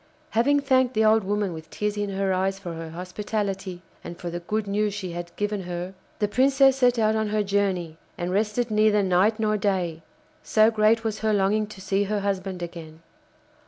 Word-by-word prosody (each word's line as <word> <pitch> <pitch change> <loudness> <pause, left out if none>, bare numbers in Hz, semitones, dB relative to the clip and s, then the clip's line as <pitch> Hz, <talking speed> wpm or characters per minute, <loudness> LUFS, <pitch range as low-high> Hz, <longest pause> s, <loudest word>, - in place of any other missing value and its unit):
Having 285 +6 +3
thanked 260 -3 +2
the 220 0 +3
old 220 0 +4
woman 205 -1 -1
with 160 0 -9
tears 210 0 -2
in 205 -1 -2
her 195 -1 0
eyes 190 +1 0
for 180 -3 -7
her 165 0 -7
hospitality, 190 +1 -4 0.2
and 170 - -8
for 175 - -5
the 175 - -4
good 210 +5 -2
news 205 0 0
she 190 -4 -5
had 170 0 -6
given 205 -1 -2
her, 180 +1 -5 0.2
the 210 - +1
Princess 270 +3 +4
set 250 -2 +3
out 220 -1 +2
on 220 0 0
her 210 0 0
journey 190 -5 -1 0.2
and 175 +1 -3
rested 215 +4 0
neither 215 -1 +3
night 190 +4 +2
nor 215 -1 +1
day, 185 -5 -1 0.4
so 215 +1 +4
great 220 +1 +3
was 220 -1 -2
her 215 0 +1
longing 205 +2 +2
to 210 -2 -12
see 195 +1 0
her 205 0 -1
husband 190 -2 -3
again. 165 -2 -9
205 Hz, 195 wpm, -25 LUFS, 185-215 Hz, 0.4 s, old